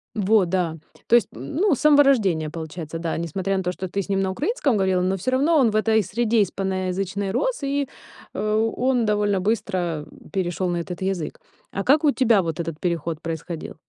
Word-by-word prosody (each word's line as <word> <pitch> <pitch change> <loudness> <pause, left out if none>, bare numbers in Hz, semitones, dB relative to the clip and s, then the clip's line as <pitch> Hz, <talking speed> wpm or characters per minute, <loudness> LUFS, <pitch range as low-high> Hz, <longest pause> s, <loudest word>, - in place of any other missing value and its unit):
Во, 205 -1 +3
да. 170 -2 -1 0.3
То 235 - +5
есть, 235 - +4
м, 130 - -8
ну, 360 -3 +3
с - - -9
самого 290 -1 +6
рождения, 190 - +2
получается, 160 0 -6
да. 165 -1 -2
Несмотря 190 +4 -2
на 190 - -1
то, 180 - -1
что 185 +1 -5
ты 200 +3 -2
с 200 - -9
ним 195 0 +1
на 190 - 0
украинском 290 - 0
говорила, 190 -2 +2
но 190 +1 0
всё 255 +8 -2
равно 300 +5 +3
он 240 -6 +4
в - - -4
этой 220 0 +3
среде 225 +2 +2
испаноязычной 190 +1 -2
рос, 290 - -1
и, 280 0 0 0.5
э, 215 +1 +1
он 250 -2 +2
довольно 205 -2 +1
быстро, 185 -6 -1
э, - - -17
перешёл 185 -1 -1
на 175 - -1
этот 175 +2 -5
язык. 190 -4 -3 0.3
А 195 - -3
как 295 +7 +4
у 295 - +5
тебя 235 -7 +3
вот 165 -1 -4
этот 165 -2 -4
переход 170 -2 -2
происходил? 165 0 -5
195 Hz, 205 wpm, -23 LUFS, 175-230 Hz, 0.5 s, самого